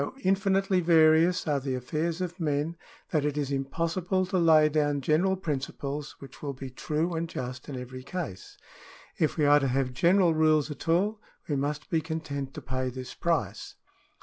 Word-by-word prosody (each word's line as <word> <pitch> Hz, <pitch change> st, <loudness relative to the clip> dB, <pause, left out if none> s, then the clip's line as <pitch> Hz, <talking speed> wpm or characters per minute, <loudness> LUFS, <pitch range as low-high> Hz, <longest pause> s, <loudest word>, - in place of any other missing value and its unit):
24 140 Hz, -, -1 dB
CIVIL -, -, -22 dB
LAW -, -, -17 dB
[§ -, -, -22 dB
10 185 Hz, -, +2 dB
infinitely 195 Hz, -1 st, +2 dB
various 165 Hz, +1 st, +4 dB
are 145 Hz, -2 st, +2 dB
the 135 Hz, -1 st, -2 dB
affairs 160 Hz, +7 st, -2 dB
of 180 Hz, 0 st, -4 dB
men, 150 Hz, +1 st, -1 dB, 0.4 s
that 155 Hz, -4 st, +1 dB
it 150 Hz, 0 st, -1 dB
is 145 Hz, -2 st, -1 dB
impossible 165 Hz, +7 st, -1 dB
to 185 Hz, 0 st, 0 dB
lay 160 Hz, -2 st, +6 dB
down 145 Hz, -1 st, +1 dB
general 160 Hz, +7 st, +2 dB
principles 145 Hz, -3 st, -4 dB
which 135 Hz, -2 st, -13 dB
will 140 Hz, -2 st, -3 dB
be 130 Hz, 0 st, -8 dB
true 155 Hz, +6 st, -2 dB
and 165 Hz, 0 st, -2 dB
just 125 Hz, -1 st, -6 dB
in 135 Hz, -3 st, -5 dB
every 130 Hz, +1 st, -8 dB
case. 140 Hz, -, -6 dB, 0.6 s
If 155 Hz, -, +1 dB
we 150 Hz, -, +3 dB
are 145 Hz, 0 st, +6 dB
to 135 Hz, -, 0 dB
have 130 Hz, 0 st, 0 dB
general 175 Hz, +5 st, +4 dB
rules 155 Hz, -1 st, +3 dB
at 150 Hz, -, -8 dB
all, 205 Hz, +6 st, +2 dB, 0.3 s
we 150 Hz, -, 0 dB
must 145 Hz, +1 st, -3 dB
be 165 Hz, -2 st, +2 dB
content 145 Hz, -4 st, -5 dB
to -, -, -7 dB
pay 130 Hz, 0 st, -2 dB
this 125 Hz, 0 st, -7 dB
price. 130 Hz, -, -2 dB
155 Hz, 200 wpm, -28 LUFS, 140-170 Hz, 0.6 s, lay